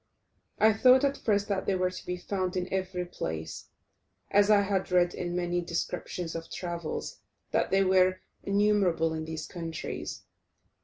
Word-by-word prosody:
I 220 0 +5
thought 255 +4 +6
at 280 0 +2
first 205 -4 0
that 195 -2 -1
they 195 - +2
were 185 0 +1
to - - -9
be 180 0 -2
found 185 0 -2
in 180 +1 -3
every 185 -1 -2
place, 80 - -5 0.6
as 205 +1 +5
I 210 -1 +6
had 195 -2 -1
read 175 -1 +3
in 175 -1 -3
many 175 0 0
descriptions 170 0 -3
of 165 0 -6
travels 170 -3 -5 0.3
that - - +1
they 195 +1 +4
were 185 0 +3 0.2
innumerable 200 -5 +2
in 160 0 -4
these 160 0 -5
countries. 165 -3 -6
185 Hz, 160 wpm, -29 LUFS, 175-200 Hz, 0.6 s, thought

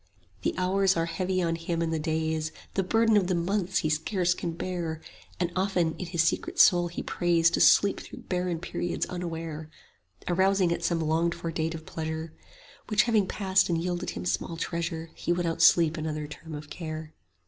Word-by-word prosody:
The - - -1
hours 190 0 +2
are 165 - +1
heavy 185 +2 -1
on 165 -1 0
him 165 0 -3
and 165 -1 0
the 160 - 0
days; 160 0 -1 0.2
The 195 - +1
burden 225 +4 +3
of 190 -3 +2
the 185 - +1
months 190 +2 0
he - - +2
scarce 175 +3 +1
can 170 -1 -4
bear; 170 -2 -3 0.4
And 175 -1 0
often 180 -4 +1
in 180 - -5
his 170 -2 +1
secret - - -1
soul 175 -1 +6
he 170 - -5
prays 170 -1 +2
10 - - -15
To - - +2
sleep 200 -1 +5
through - - -10
barren 180 -2 -1
periods 175 +1 -3
unaware, 165 -3 -5 0.6
Arousing 190 0 +3
at 170 - -2
some 165 0 +1
longed 165 +2 +1
for 165 - -4
date 165 0 -2
of 160 -1 -9
pleasure; 160 0 -5 0.5
Which 215 -1 +4
having 220 -5 +2
passed 190 -2 +2
and 165 -1 +1
yielded 175 +1 -2
him 85 - -5
small 95 - -2
treasure, 165 -1 -3
He - - -3
would 175 0 +1
outsleep 165 0 +4
another 155 -1 -3
term 155 +1 -9
of 150 0 -9
care. 155 -2 -6
170 Hz, 190 wpm, -28 LUFS, 160-180 Hz, 0.6 s, soul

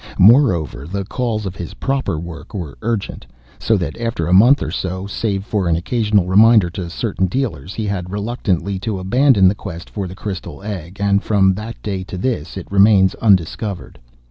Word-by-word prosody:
Moreover, 90 - +4
the 100 +2 -4
calls 110 -1 -2
of 95 -1 -5
his 85 -3 -7
proper 135 - -1
work 80 +1 -9
were 80 -8 -5
urgent. 115 -3 -3 0.3
So 110 - +2
that 90 - -3
after 115 -8 -2
a 85 - +1
month 120 +9 +6
or - - -4
so, 95 +1 -3
save 100 -1 -2
for 100 -5 -1
an 85 - +2
occasional 105 +2 +1
reminder 105 0 +5
to 90 -1 -5
certain 95 +1 -1
dealers, 100 - -3
he 110 - -3
had 95 -3 -3
reluctantly 100 -3 -2
to 105 +1 -3
abandon 105 +1 +4
the 95 - +4
quest 90 -4 -9
for 100 -3 -4
the 90 - -9
crystal 100 -1 -6
egg, 95 -3 -6
and 100 0 +2
from 95 -3 +3
that 110 +4 -7
day 95 -3 -3
to 95 0 -7
this 95 - -3
it 95 - -6
remains 100 -1 +5
undiscovered. 95 - 0
100 Hz, 185 wpm, -18 LUFS, 90-110 Hz, 0.3 s, month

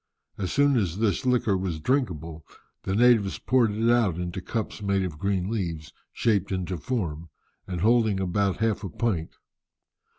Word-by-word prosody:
As 95 -3 -2
soon 145 -2 +3
as 95 -5 -1
this 110 +2 0
liquor 120 -5 +2
was 90 -4 -2
drinkable, 80 - -1 0.4
the 95 - -1
natives 115 -4 +4
poured 125 -2 +2
it 110 +3 -1
out 115 -8 +3
into 90 +1 -4
cups 110 +3 -4
made 100 -1 +1
of 80 -5 -5
green 95 -1 0
leaves, 85 -8 -4 0.2
shaped 100 -5 0
into 95 -2 -2
form, 85 -7 -3 0.4
and 90 -3 -4
holding 110 -2 +3
about 95 +1 0
half 110 -1 0
a 95 - -4
pint. 90 -4 -2
100 Hz, 160 wpm, -26 LUFS, 90-115 Hz, 0.4 s, natives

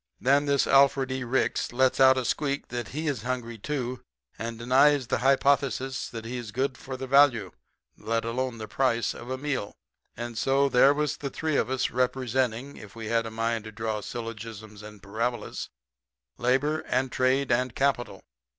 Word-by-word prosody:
"Then 140 +3 +3
this 140 -1 +3
Alfred 135 -1 +4
E. 130 0 -2
Ricks 125 +2 0
lets 130 +2 +2
out 130 0 +7
a 130 - -1
squeak 140 +1 -1
that 120 -2 -4
he 155 +4 -5
is 140 -7 -1
hungry, 120 -2 -4
too, 130 -1 -3 0.4
and 115 +1 -4
denies 130 +4 +4
the - - -1
hypothesis 135 0 +1
that 115 -1 -7
he 125 +2 -4
is 120 -3 -6
good 130 +3 -1
for 130 0 -7
the 130 - -5
value, 130 -7 +4 0.4
let 115 0 -2
alone 125 +1 -2
the 110 -1 -6
price, 120 0 0
of 120 - -10
a 130 - -2
meal. 135 -7 -3 0.4
And 120 -1 -5
so, 140 +1 +2
there 135 +3 +5
was 150 0 -1
the 140 - -4
three 155 +2 -2
of - - +1
us, 130 0 0
representing, 125 0 -1
if 105 -1 -12
we 110 -1 -6
had 115 -1 +1
a - - -4
mind 115 0 -2
to 110 - -7
draw 110 -1 -3
syllogisms 110 -2 -7
and 105 -2 -12
parabolas, 115 +4 -3 0.7
labor 135 +6 +1
and 130 +1 0
trade 130 +1 +1
and 125 0 +1
capital. 120 -8 0
125 Hz, 180 wpm, -27 LUFS, 115-135 Hz, 0.7 s, out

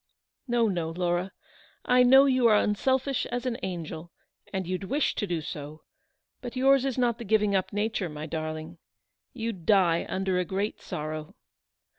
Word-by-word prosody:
No, 240 -2 +2
no, 175 -5 -1
Laura. 175 +2 -1 0.5
I 250 0 +5
know 265 +2 +7
you 255 -3 +4
are 215 - +5
unselfish 260 +6 +1
as 245 +1 -4
an 250 -1 -2
angel, 170 -3 -5 0.4
and 190 -1 -2
you'd 185 +2 -3
wish 280 +9 0
to 205 - -2
do 170 -3 -2
so; 150 0 -8 0.6
but 245 0 -7
yours 270 +1 +4
is 265 -2 -2
not 240 -2 +1
the - - -5
giving 210 -1 +2
up 190 - 0
nature, 205 -3 -1
my 150 0 -6
darling. 155 +1 -5 0.5
You'd 225 -7 -5
die 185 -5 +3
under 190 -1 0
a - - +1
great 195 +4 -3
sorrow." 155 0 -6
195 Hz, 165 wpm, -27 LUFS, 170-240 Hz, 0.6 s, know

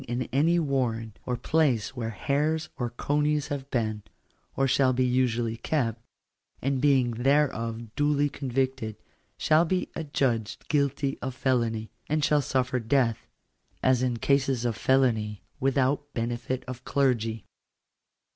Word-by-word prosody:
219 120 +1 -2
in - - -4
any 170 +4 +4
warren, 125 -8 -1
or 125 -1 -1
place 130 -4 +1
where 115 -3 -3
hares 150 +8 0
or 120 -1 -2
conies 145 +4 0
have 140 -1 -4
been, 110 -5 -1 0.5
or 135 - +2
shall 130 0 +3
be 130 +1 +2
usually 120 -2 +1
kept, 115 -3 -1 0.6
and 135 -1 -1
being 135 -4 +3
thereof 115 -3 0
duly 145 0 +2
convicted, 130 -5 -2 0.4
shall 155 +1 +4
be 180 +2 -1
adjudged 130 -8 -1
guilty 140 -1 0
of 130 -1 -4
felony, 115 -4 0 0.2
and 155 -1 +2
shall 150 -1 +3
suffer 130 -1 0
death, 115 - +1 0.6
as 130 -1 +4
in 125 -2 0
cases 135 -1 +1
of 115 -2 0
felony, 110 -5 +1 0.2
without 135 +2 +1
benefit 120 +2 -2
of 125 0 -7
clergy." 115 -7 0
130 Hz, 135 wpm, -27 LUFS, 115-140 Hz, 0.6 s, any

